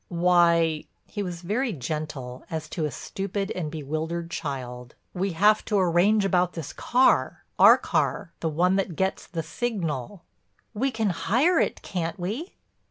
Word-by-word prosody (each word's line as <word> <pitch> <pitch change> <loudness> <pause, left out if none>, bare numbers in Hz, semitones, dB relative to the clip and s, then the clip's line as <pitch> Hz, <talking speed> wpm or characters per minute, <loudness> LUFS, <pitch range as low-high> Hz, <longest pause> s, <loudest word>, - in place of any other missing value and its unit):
"Why—" 170 -2 +3 0.2
he 205 - -5
was 180 -3 -5
very 225 +6 -1
gentle 140 -3 -5
as 160 -1 -4
to 160 - -2
a - - -1
stupid 195 - -4
and 165 -4 -3
bewildered 160 +3 -4
child—"we 135 +6 -5
have 210 +5 +4
to 210 - +1
arrange 190 +3 +3
about 180 -2 +2
this 160 -4 -6
car—our 255 +2 +4
car, 195 -5 -1
the 160 - -1
one 180 +5 +2
that 190 -4 -1
gets 190 +3 -1
the 165 -3 -4
signal." 165 - -3 0.5
"We 250 +6 0
can 220 -5 0
hire 275 - +2
it, - - -1
can't 175 -1 -3
we?" 220 - -4
175 Hz, 145 wpm, -26 LUFS, 160-200 Hz, 0.5 s, have